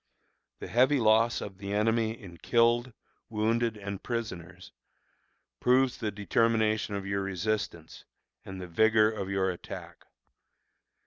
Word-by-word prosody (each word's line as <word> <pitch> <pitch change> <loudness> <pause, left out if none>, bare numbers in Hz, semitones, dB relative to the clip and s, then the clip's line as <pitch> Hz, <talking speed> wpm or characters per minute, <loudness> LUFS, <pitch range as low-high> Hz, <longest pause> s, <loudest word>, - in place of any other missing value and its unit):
The - - -8
heavy 130 +8 +3
loss 115 +1 +3
of 95 -2 -8
the 100 0 -5
enemy 110 +1 +1
in 90 -5 -12
killed, 120 +6 +2 0.4
wounded, 115 +1 0
and 100 -1 -6
prisoners, 90 -7 -6 0.9
proves 130 +1 +3
the 110 - -1
determination 110 +1 +1
of 100 -1 -4
your 100 0 -1
resistance 95 -3 -3 0.4
and 95 -1 -8
the 90 - -6
vigor 110 +4 +4
of 100 -3 -5
your 95 -1 +1
attack. 90 - -10
110 Hz, 125 wpm, -29 LUFS, 95-115 Hz, 0.9 s, vigor